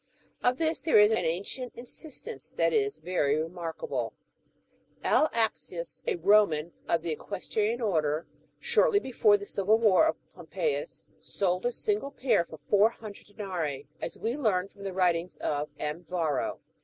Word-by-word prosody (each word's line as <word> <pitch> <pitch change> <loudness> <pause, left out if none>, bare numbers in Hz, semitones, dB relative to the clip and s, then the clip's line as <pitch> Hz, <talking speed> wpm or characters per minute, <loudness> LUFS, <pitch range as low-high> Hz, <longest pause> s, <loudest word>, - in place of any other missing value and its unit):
Of 250 +1 +2
this 325 0 0
there 320 - +4
is 210 +1 +7
an 220 -5 +1
ancient 200 +10 -3
instance 310 - -7
that - - +3
is 420 -2 +1
very 150 -6 +1
remarkable; 165 - -3 0.9
L. 310 - +4
Axius, 230 - -2
a 450 -7 +1
Eoman 200 - +4 0.2
of 165 -1 +1
the 170 - -2
equestrian 215 +7 -2
order, 155 -7 +1 0.3
shortly - - +3
before 225 - +3
the 200 - -8
Civil 200 +2 +2
"War 225 +6 +5
of - - +1 0.2
Pompeius, - - -3
sold 185 +2 -1
a - - 0
single 410 - -1
pair 235 -10 +1
for 160 - -11
four 205 +1 +5
hundred 215 -3 -11
denarii, 175 -10 -4 0.2
as - - -4
we 230 +3 -2
learn 200 -9 +1
from 200 0 -12
the 195 - -3
writings 180 -1 +1
of 150 0 -2
M. 150 +3 -4
Yarro. 160 -6 -1
205 Hz, 155 wpm, -29 LUFS, 170-245 Hz, 0.9 s, is